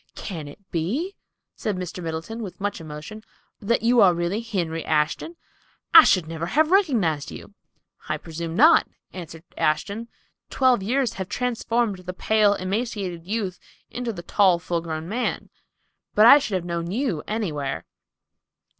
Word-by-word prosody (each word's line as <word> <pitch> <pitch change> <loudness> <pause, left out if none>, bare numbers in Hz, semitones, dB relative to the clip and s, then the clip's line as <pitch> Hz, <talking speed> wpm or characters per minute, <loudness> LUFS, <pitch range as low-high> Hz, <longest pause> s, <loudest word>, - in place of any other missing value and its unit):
"Can 165 -7 -6
it 145 - -11
be," 245 - -2 0.4
said 210 -3 -3
Mr. 180 0 -6
Middleton, 165 +8 -5
with 195 -5 -7
much 200 -3 -3
emotion, 155 +8 -9 0.4
"that 225 +2 0
you 235 -1 +5
really 175 +2 +2
are - - -7
Henry 170 -7 -2
Ashton? 155 - 0 0.6
I 325 -2 +11
should 180 -4 +3
never 165 +1 -4
have 310 - +2
recognized 230 - +2
you." - - -10 0.6
"I - - 0
presume 165 0 -6
not," 310 - +6 0.3
answered 165 -3 -9 0.2
Ashton. 200 +9 0 0.4
"Twelve 255 -5 +3
years 245 +3 0
have 190 -3 -6
transformed 235 -4 -1
the 180 0 -7
pale, 210 +1 +3
emaciated 190 -4 -3
youth 200 -4 -2 0.3
into 245 -1 -3
the 175 -5 -8
tall, 185 -1 +3
full 170 -1 -2
grown 160 -1 -5
man. 235 +6 -3 0.6
But 215 - +7
I 280 +5 +10
should 215 -8 -3
have 180 -2 -2
known 170 -1 -3
you 215 - -1
anywhere." 160 -11 -3
190 Hz, 150 wpm, -24 LUFS, 170-230 Hz, 0.6 s, I